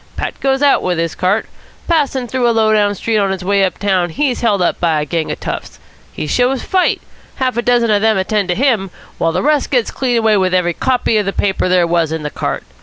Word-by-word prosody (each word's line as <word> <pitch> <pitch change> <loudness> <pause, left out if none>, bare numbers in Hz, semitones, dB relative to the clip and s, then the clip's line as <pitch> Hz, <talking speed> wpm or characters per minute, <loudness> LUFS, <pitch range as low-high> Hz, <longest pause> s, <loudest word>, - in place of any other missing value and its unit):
Pat - - -4
goes 270 +1 0
out 285 - +4
with 180 -2 -1
his 165 -1 -1
cart. 190 +4 0 0.4
Passing 280 -6 0
through 245 0 0
a 230 - 0
low 220 -1 +3
down 205 -1 +2
street 220 +2 -1
on 200 -1 +1
his 190 -1 -3
way 200 +1 +2
up 190 - -1
town 190 -3 0
he's 255 - -1
held 215 -4 +2
up 180 - 0
by 165 -3 +1
a 150 - -2
bunch 165 0 -2
of - - -5
toughs. - - -6 0.3
He - - -5
shows 250 - 0
fight. 370 -1 +1 0.4
Half 255 -2 -1
a 235 - 0
dozen 240 -2 +2
of 205 -1 +2
them 220 -1 +3
attend 195 0 -1
to 180 - +1
him, 230 -6 +1 0.3
while 165 - +1
the - - -1
rest 295 0 +1
gets 245 -4 0
clean 250 -3 -1
away 220 -2 +3
with 185 -1 +1
every 175 -1 +1
copy 250 +1 0
of 205 - -2
the 195 - -1
paper 195 -2 0
there 180 -1 +3
was 170 -2 0
in 160 -1 -3
the 150 - -4
cart. - - -3
210 Hz, 250 wpm, -16 LUFS, 180-245 Hz, 0.4 s, out